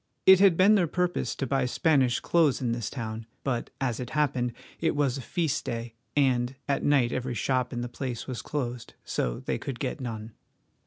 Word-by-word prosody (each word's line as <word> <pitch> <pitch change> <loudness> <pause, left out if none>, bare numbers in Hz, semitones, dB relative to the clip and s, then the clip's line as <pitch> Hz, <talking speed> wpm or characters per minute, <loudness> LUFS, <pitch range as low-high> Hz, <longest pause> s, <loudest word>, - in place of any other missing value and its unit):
It 190 -1 +9
had 190 -4 +6
been 195 +3 +6
their 185 -5 +4
purpose 180 +2 -1
to 135 - -2
buy 135 -1 +1
Spanish 130 -3 +2
clothes 160 -6 +3
in 125 -3 -1
this 115 -3 -2
town, 110 -3 -5 0.2
but, 125 -4 -1
as 125 -4 -1
it 125 -1 -5
happened, 130 -5 +1 0.3
it 160 -2 +1
was 140 -2 +1
a - - -5
feast 145 +1 -1
day, 115 0 -4 0.2
and 130 -2 +2
at 140 -1 0
night 135 -5 +3
every 130 -1 -2
shop 130 +1 0
in 120 -2 -3
the 120 - -3
place 120 -1 -5
was 130 -3 -5
closed, 125 -5 -4
so - - -2
they - - -2
could 135 -3 -5
get 135 +2 -3
none. 115 -2 -5
130 Hz, 200 wpm, -28 LUFS, 120-145 Hz, 0.3 s, It